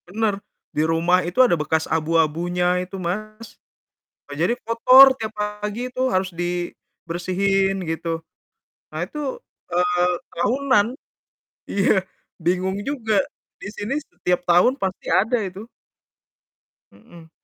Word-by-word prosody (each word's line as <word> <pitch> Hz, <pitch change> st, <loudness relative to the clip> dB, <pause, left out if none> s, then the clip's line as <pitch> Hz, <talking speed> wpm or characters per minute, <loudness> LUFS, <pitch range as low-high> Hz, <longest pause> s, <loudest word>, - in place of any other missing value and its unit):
Benar, 205 Hz, +1 st, -1 dB, 0.3 s
di 150 Hz, -, +2 dB
rumah 170 Hz, +3 st, +3 dB
itu 180 Hz, -, -4 dB
ada 240 Hz, -, +2 dB
bekas 160 Hz, 0 st, 0 dB
abu-abunya 165 Hz, +3 st, +1 dB
itu, 185 Hz, +2 st, -7 dB
Mas. 215 Hz, +5 st, -5 dB, 0.8 s
Nah, -, -, -5 dB
jadi 175 Hz, +8 st, +2 dB
kotor 255 Hz, +4 st, +8 dB
tiap 220 Hz, -1 st, -4 dB
pagi 210 Hz, +3 st, -4 dB
tuh 255 Hz, +1 st, -1 dB
harus 185 Hz, 0 st, +1 dB
dibersihin 180 Hz, +2 st, -2 dB
gitu. 165 Hz, 0 st, -3 dB, 0.7 s
Nah 155 Hz, -, -4 dB
itu, 300 Hz, -, -9 dB, 0.5 s
eee, 180 Hz, 0 st, +2 dB, 0.3 s
tahunan. 245 Hz, +2 st, +2 dB, 0.8 s
Iya, 200 Hz, 0 st, +3 dB, 0.5 s
bingung 185 Hz, +3 st, 0 dB
juga, 235 Hz, -7 st, -1 dB, 0.5 s
di -, -, -6 dB
sini 210 Hz, +6 st, -3 dB
setiap 180 Hz, -11 st, -2 dB
tahun 175 Hz, +9 st, +5 dB
pasti 190 Hz, -1 st, -3 dB
ada 225 Hz, +6 st, +3 dB
itu. 195 Hz, +2 st, -7 dB, 1.3 s
Mhm. 160 Hz, +11 st, -17 dB
185 Hz, 115 wpm, -22 LUFS, 175-215 Hz, 1.3 s, kotor